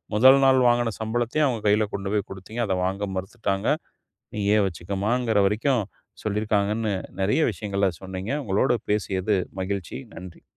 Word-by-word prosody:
முதல் 130 +5 +7
நாள் 130 -1 +5
வாங்கின 120 -2 +2
சம்பளத்தையும் 120 +6 +1
அவங்க 115 -4 -2
கையில 105 +1 +3
கொண்டு 100 0 -4
போய் 105 -2 0
கொடுத்தீங்க. 95 +5 -6
அதை 95 -2 0
வாங்க 100 +2 -2
மறுத்துட்டாங்க. 95 0 -2 0.7
"நீயே 105 +1 +2
வச்சுக்கோமா"ங்கிற 100 +6 -1
வரைக்கும் 115 +3 +1 0.4
சொல்லியிருக்காங்கன்னு. 105 0 0 0.3
நிறைய 105 +11 +2
விஷயங்கள 100 -2 -1
சொன்னீங்க. 95 +5 -5
உங்களோடு 110 +5 +2
பேசியது 100 -1 +1 0.2
மகிழ்ச்சி. 95 -8 -3 0.2
நன்றி. 90 0 -10
105 Hz, 130 wpm, -25 LUFS, 95-115 Hz, 0.7 s, முதல்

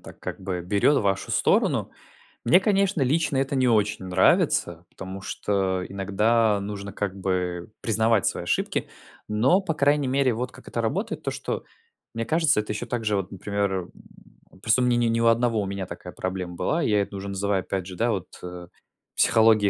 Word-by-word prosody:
так, - - -13
как - - -6
бы 95 -2 -3
берет 100 +11 +2
вашу 100 -3 -1
сторону. - - +2 0.5
Мне, 170 +10 +6
конечно, 195 -4 +1
лично 145 +2 +1
это 135 +1 0
не 130 -1 +3
очень 105 -4 +1
нравится, 85 -1 +2
потому 95 +1 -8
что 95 -2 -1
иногда 105 +3 +2
нужно 100 0 -6
как 100 -2 -3
бы 90 -1 -2
признавать 110 -1 +2
свои - - -1
ошибки. - - -1 0.4
Но, 125 - +3
по 180 -4 -2
крайней 145 -1 +2
мере, 130 -1 +2
вот 125 +3 -3
как - - -16
это - - -2
работает: - - -2
то, - - -1
что - - -4 0.5
мне 115 0 -3
кажется 160 -2 +3
это 105 - -3
еще 105 - -4
также, 110 -4 -1
вот, 95 -1 -3
например, 100 +1 -2
м, 90 -2 -4 0.7
просто 115 +5 +3
у - - +3
меня 120 -1 +3
не 120 -1 +2
не 115 0 +1
у 115 - +4
одного 115 -1 +3
у - - -2
меня 100 0 -4
такая - - -9
проблема 95 -1 -4
была, 165 - 0
я 105 -7 +2
это 100 - -5
уже 100 0 -5
называю, 100 0 0
опять 95 -1 -3
же, 95 0 -8
да, 115 +6 +1
вот, 95 -6 -3 0.2
э, 90 -1 -8 0.5
"психологией 110 -2 +4
105 Hz, 190 wpm, -25 LUFS, 95-120 Hz, 0.7 s, Мне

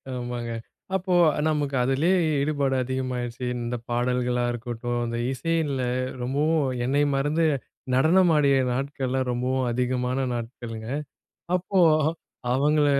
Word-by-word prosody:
ஆமாங்க. 120 -1 -4 0.4
அப்போ 185 -1 0 0.2
அ - - -1
நமக்கு 145 -3 0
அதிலேயே 150 +9 +2 0.2
ஈடுபாடு 140 -2 +1
அதிகமா 130 0 -2
ஆய்டுச்சி. 120 +1 -4 0.2
இந்த 120 +1 -2
பாடல்களா 125 0 0
இருக்கட்டும், 120 0 -3
இந்த 115 0 -3
இசையில 145 0 -1 0.4
ரொம்பவும் 145 +3 +1 0.2
என்னை 140 +3 +2
மறந்து 150 +4 +1 0.5
நடனம் 165 +6 +5
ஆடிய 140 -2 +4 0.2
நாட்கள்ளாம் 130 -1 -1
ரொம்பவும் 125 +1 0
அதிகமான 125 +1 0
நாட்கள்ங்க. 115 -1 -6 0.7
அப்போ, 185 +1 0 0.7
அவங்கள 145 +2 +3
130 Hz, 110 wpm, -25 LUFS, 125-145 Hz, 0.7 s, நடனம்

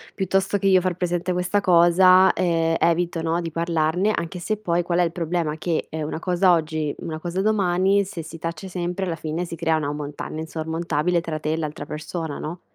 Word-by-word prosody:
"Piuttosto 195 +1 +1
che 195 - 0
io 190 -1 +5
far 180 -1 -1
presente 175 0 -1
questa 180 +3 0
cosa, 185 +1 +6
ehm, 165 -2 +1
evito 170 0 +1
no, 165 +1 0
di 165 -1 -5
parlarne" 170 +4 +1
anche 170 +2 -4
se 215 +4 -2
poi 175 -4 0
qual 175 0 0
è - - +5
il 165 - 0
problema, 165 -3 -2
che 165 0 -2
è 160 - -5
una 155 +1 -3
cosa 180 +1 +3
oggi, 155 -3 -1
una 155 -1 -5
cosa 175 +3 -2
domani, 195 -1 +2
se 180 -4 -6
si 165 +1 -9
tace 165 +3 -5
sempre 180 +1 -3
alla 170 -3 -2
fine 160 +2 -3
si 170 - -6
crea 165 -1 +1
una 145 -2 -2
montagna 150 +1 -6
insormontabile 160 +1 -1
tra 160 -2 -4
te 155 0 -2
e 160 - -1
l'altra 150 -2 -4
persona 155 0 -5
no? 170 +3 -6
170 Hz, 205 wpm, -23 LUFS, 160-180 Hz, -, cosa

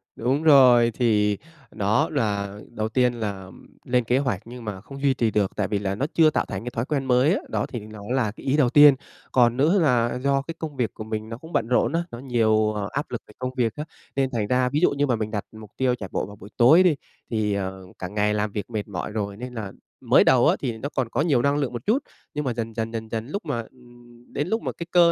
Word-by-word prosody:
Đúng 130 +6 0
rồi, 125 -6 +7
thì 105 -4 +2 0.3
nó 110 +9 +1
là 100 -7 -2
đầu 110 -2 -3
tiên 125 +1 +2
là 100 -5 -5 0.3
lên 125 0 +2
kế 120 +3 +1
hoạch 130 -9 -1
nhưng 120 0 -10
mà 100 -3 -5
không 135 +5 -10
duy 140 -1 +3
trì 115 -3 0
được 100 -3 +1
tại 100 - 0
vì 105 0 -1
là 100 -1 -2
nó 130 - -1
chưa 160 -2 +5
tạo - - 0
thành 95 +1 -5
cái 125 - -5
thói 115 +1 -2
quen 140 -2 -1
mới 130 +5 +3
á, - - 0
đó - - -1
thì 120 - -6
nó 105 0 -11
là 125 -4 +1
cái 110 - -14
ý 135 +2 +2
đầu 135 -5 +4
tiên. 145 +1 +8 0.4
Còn 120 -1 +3
nữa 160 +9 +3
là 125 -6 +2
do 140 0 +2
cái 165 +4 -7
công 155 -3 -5
việc 120 -4 -1
của - - -7
mình 110 0 -5
nó 115 - -6
cũng 160 +6 -13
bận 110 - +1
rộn 125 +5 +2
á, 170 +1 +1
nó 120 - -7
nhiều 110 -4 +2 0.2
áp 145 +2 -4
lực 120 - -4
về 105 - -16
công 125 0 -3
việc 115 -3 +1
á, 150 - -4 0.3
nên 135 -1 +1
thành 110 -5 -1
ra, 125 +1 +2
ví 145 +3 0
dụ 175 - +4
như 145 0 0
mà 125 - +2
mình 110 -1 -3
đặt 105 -2 -3
mục 110 -2 -12
tiêu 130 -1 +2
chạy 100 -6 -8
bộ - - -1
vào 100 - -11
buổi 100 0 -13
tối 150 +10 +7
đi 175 -5 +4 0.3
thì, 110 -2 0
ờ, 95 -1 -4
cả 90 - -4
ngày 105 +2 0
làm 105 0 -1
việc 100 0 -5
mệt 110 -3 -4
mỏi 100 0 -5
rồi 100 -2 -3
nên 125 +2 -7
là 105 -4 -5 0.3
mới - - +5
đầu - - +5
á - - +4
thì 115 -2 -3
nó 140 +6 -4
còn 130 -3 0
có 135 - 0
nhiều 145 -6 +2
năng 140 +3 +2
lượng 135 -4 -1
một 120 -1 -6
chút. 250 +7 +2 0.3
Nhưng 150 -1 -3
mà 125 - 0
dần 115 -1 -4
dần, 115 0 -3
dần 110 -1 -5
dần, 110 +1 -4
lúc 200 +9 -5
mà 125 -5 -2
ừm, 120 -1 -19
đến 145 +3 -1
lúc 225 +4 0
mà - - -3
cái 170 - -7
cơ 170 -1 +6
120 Hz, 270 wpm, -24 LUFS, 110-135 Hz, 0.4 s, tiên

